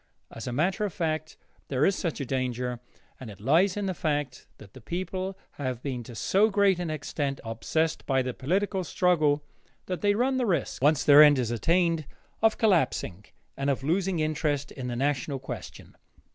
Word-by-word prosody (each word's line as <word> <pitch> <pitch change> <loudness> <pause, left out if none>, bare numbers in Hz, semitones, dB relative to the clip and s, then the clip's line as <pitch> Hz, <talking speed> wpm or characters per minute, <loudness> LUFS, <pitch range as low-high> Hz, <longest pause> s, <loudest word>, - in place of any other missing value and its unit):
As 115 - -8
a - - -2
matter 180 - 0
of 205 - -1
fact, 155 -2 -3 0.3
there 135 +2 +1
is 195 - +3
such 170 -5 -3
a 140 - -3
danger, 125 -1 -2 0.4
and 130 - -8
it 100 - -11
lies 170 - +3
in 205 - -1
the 190 - -1
fact 145 -6 -2
that 100 -2 -15
the 130 - -12
people 185 - -4
have 130 -4 -4
been 130 -4 -3
to 120 - -10
so 200 - +3
great 200 -3 +3
an 175 -2 -3
extent 145 -2 -3
obsessed 155 +8 -1
by 135 -2 +2
the 125 0 -3
political 190 - -1
struggle 155 -4 +2 0.4
that 180 -1 -4
they 205 0 +3
run 260 +4 +1
the 250 -2 0
risk, 175 -7 -1
once 145 +1 +3
their 145 0 +8
end 145 -2 +7
is 120 -3 -1
attained, 165 +4 +1 0.3
of 220 0 +3
collapsing 165 - +1 0.3
and 140 +1 -1
of 135 -1 -1
losing 180 +4 0
interest 155 -2 -1
in 130 -3 -6
the 120 - -3
national 140 +1 -1
question. - - -9
155 Hz, 185 wpm, -27 LUFS, 130-185 Hz, 0.4 s, their